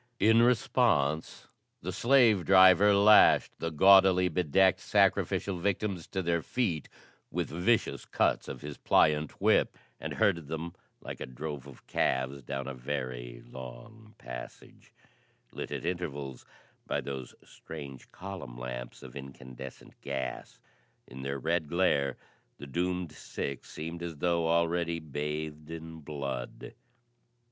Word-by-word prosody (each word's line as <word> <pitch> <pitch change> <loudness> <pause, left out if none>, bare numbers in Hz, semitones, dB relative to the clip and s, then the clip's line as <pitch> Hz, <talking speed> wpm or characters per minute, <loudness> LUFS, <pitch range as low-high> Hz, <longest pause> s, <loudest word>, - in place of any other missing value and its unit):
In 115 +3 +5
response, 120 - +2 0.4
the 90 - -3
slave 115 -2 +4
driver 95 +2 +7
lashed 105 +2 +6
the 85 - -2
gaudily 95 +2 +6
bedecked 90 +3 +3
sacrificial 95 -3 +1
victims 95 -1 -1
to 95 - -3
their 85 -1 +1
feet 90 - -2 0.4
with - - -3
vicious 95 +8 +1
cuts - - +1
of - - -7
his 75 0 -7
pliant 75 0 +2
whip, - - +3 0.2
and - - -5
herded 85 -3 +1
them 80 +2 -5 0.3
like - - -7
a - - -5
drove 70 +1 -6
of 70 - -14
calves 65 +2 0
down 70 +1 -4
a 70 - -4
very 65 -2 -5
long 65 - -11
passage, - - -10 0.6
lit - - -6
at - - -4
intervals 70 -7 -4 0.4
by - - 0
those 65 -2 -6
strange 70 -5 -10
column 90 -11 -8
lamps - - -7
of 65 - -11
incandescent 65 -1 -10
gas. 65 -2 -5 0.5
In 65 +2 -10
their 70 +1 -3
red 80 +1 -1
glare 75 -6 +1 0.4
the 70 - -9
doomed 90 +3 -2
six 70 -3 -6
seemed 80 +2 -6
as 85 -3 -5
though 85 +1 +1
already 85 0 +1
bathed 75 0 -5
in 80 0 -8
blood. 70 -5 -6
80 Hz, 130 wpm, -30 LUFS, 70-90 Hz, 0.6 s, driver